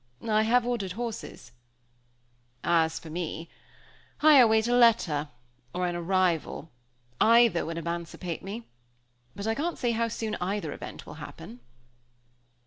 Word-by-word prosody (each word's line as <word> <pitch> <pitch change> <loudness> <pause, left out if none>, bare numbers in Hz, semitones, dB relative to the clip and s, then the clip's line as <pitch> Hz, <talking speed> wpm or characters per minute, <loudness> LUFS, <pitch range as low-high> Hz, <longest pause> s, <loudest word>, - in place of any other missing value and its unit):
"I 215 -1 +3
have 235 +2 +3
ordered 220 -7 -2
horses." 230 - -6 1.1
"As 165 -1 +2
for 160 - -9
me 165 0 -4 0.7
I 305 -1 +8
await 220 -2 +5
a 240 - +1
letter, 195 -12 +3 0.5
or 180 0 0
an 175 -1 -2
arrival, 175 -3 0 0.5
either 230 -7 +5
would 165 0 -4
emancipate 170 0 -4
me; 205 +5 -6 0.7
but 200 - -6
I 220 - +1
can't 325 +8 -2
say 240 -2 0
how 230 0 0
soon 220 -1 -3
either 180 -4 -2
event - - -9
will - - -9
happen." 120 - -10
195 Hz, 135 wpm, -28 LUFS, 170-230 Hz, 1.1 s, I